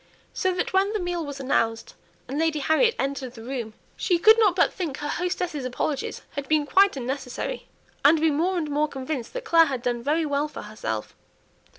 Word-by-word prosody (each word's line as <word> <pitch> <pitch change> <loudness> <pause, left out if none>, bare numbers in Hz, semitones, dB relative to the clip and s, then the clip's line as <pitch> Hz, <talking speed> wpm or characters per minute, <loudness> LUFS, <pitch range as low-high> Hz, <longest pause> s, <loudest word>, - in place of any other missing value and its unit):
So 375 - 0
that 360 - -2
when 390 +2 +2
the 430 - 0
meal 350 -2 -2
was 285 -2 -6
announced, 230 -4 0 0.3
and 280 +3 -3
Lady 320 -1 +1
Harriet 315 - +3
entered 270 -2 -3
the 225 - -10
room, 235 -4 -5 0.2
she 360 -4 +1
could 440 +6 +6
not 410 -5 +4
but 370 - +3
think 315 -7 -4
her 295 - -4
hostess's 355 -3 -2
apologies 260 +3 -3
had 280 -1 -5
been 305 0 +2
quite 390 +1 +4
unnecessary; 260 - -4 0.4
and 310 +3 +6
be 320 0 +3
more 350 +6 +1
and 320 -3 -1
more 300 +1 +2
convinced 265 -3 -5
that - - -5
Clare 330 -5 +6
had 260 -5 -3
done 240 -1 -1
very 310 +5 +1
well 290 0 0
for 300 - -9
herself. 110 - -5
295 Hz, 200 wpm, -25 LUFS, 265-350 Hz, 0.4 s, could